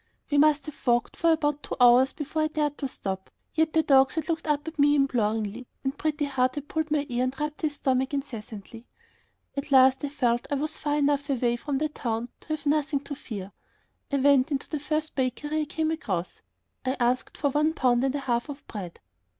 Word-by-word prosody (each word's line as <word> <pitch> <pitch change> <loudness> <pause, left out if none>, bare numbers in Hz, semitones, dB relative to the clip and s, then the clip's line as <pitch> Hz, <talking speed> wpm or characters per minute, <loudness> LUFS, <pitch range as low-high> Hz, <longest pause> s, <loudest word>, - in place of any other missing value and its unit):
We 285 - +4
must 300 0 +4
have 305 -3 -11
walked 240 0 +2
for 335 0 +3
about 295 -2 +1
two - - -5
hours 245 +2 +6
before 310 +1 -3
I 310 - +3
dared 300 -2 -1
to 275 - -1
stop, 190 -6 -4 0.2
and - - -31
yet 320 -1 +3
the 320 - +4
dogs 270 -2 +4
had 320 +1 -3
looked 320 -1 -2
up 295 +1 0
at 320 -1 -7
me 290 +1 +5
imploringly 225 -4 0 0.2
and 270 +1 -1
Pretty 305 -1 -1
Heart 255 -2 +1
had 290 -1 -5
pulled 315 0 -2
my 295 -1 +1
ear 245 -2 0
and 260 +1 -4
rubbed 300 0 -3
his 300 -2 -1
stomach 265 -1 0
incessantly. 230 -4 -6 0.7
At 280 +1 -4
last 265 0 +6
I 285 - -1
felt 240 -4 +1
that - - -1
I 280 - 0
was 305 +2 -3
far 295 -1 0
enough 285 -1 +1
away 240 -3 +1
from 275 +3 -3
the 305 +3 +1
town 235 -4 -3
to - - -22
have 310 -1 -3
nothing 290 -1 +1
to 285 - -7
fear. 205 -8 -7 0.6
I - - +1
went 275 0 +4
into 275 -2 -2
the 305 - -3
first 305 +1 -2
bakery 260 +2 -2
that 310 - -1
I 310 - +1
came 315 +1 -1
across. 190 - -3 0.4
I 260 +1 -1
asked 245 +1 0
for 285 -2 +1
one 300 +3 +2
pound 250 -4 +2
and 270 +1 +1
a 285 - -2
half 245 +1 -1
of 285 0 -8
bread. 185 -5 -7
280 Hz, 225 wpm, -27 LUFS, 250-300 Hz, 0.7 s, hours